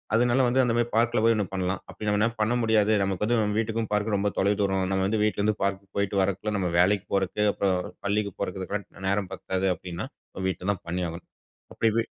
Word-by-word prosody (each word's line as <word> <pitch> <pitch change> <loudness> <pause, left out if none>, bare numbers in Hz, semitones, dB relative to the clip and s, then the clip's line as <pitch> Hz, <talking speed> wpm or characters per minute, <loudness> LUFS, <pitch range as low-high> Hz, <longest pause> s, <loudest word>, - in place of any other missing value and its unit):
அதுனால 120 +2 +3
வந்து 130 +2 +3
அந்த 120 -2 +1
மாரி 120 0 +2
பார்க்குல 115 -1 +3
போய் 115 0 +5
ஒண்ணு 105 -2 0
பண்லாம். 95 0 -1
அப்டி 105 -1 -4
நம்ம 105 +3 +2
பண்ண 110 +3 +2
முடியாது. 110 -1 +3
நமக்கு 95 +1 -1
வந்து 115 +1 +2
நம்ம 105 0 0
வீட்டுக்கும், 115 0 -1
பார்க்குக்கும் 105 0 +1
ரொம்ப 100 0 0
தொலை 100 +2 +3
தூரம். 95 -1 +1
நம்ம 95 0 +1
வந்து 105 0 0
வீட்லருந்து 105 0 +1
பார்க் 100 0 -1
போயிட்டு 100 0 0
வரக்குள்ள, 100 +3 -1
நம்ம 90 - 0
வேலைக்கு 100 +1 +3
போறது, 95 +2 0
அப்றம் 95 -2 0
பள்ளிக்கு 100 -1 0
போறதுக்கெல்லாம் 100 0 -4
நேரம் 100 -1 0
பத்தாது 95 0 -2
அப்டின்னா, 90 -2 -6 0.4
வீட்ல 95 +1 -3
தான் 95 - -11
பண்ணியாகணும். 85 -1 -4 0.5
அப்டி 115 -1 +2
வீ 115 - +1
100 Hz, 195 wpm, -26 LUFS, 95-110 Hz, 0.5 s, போய்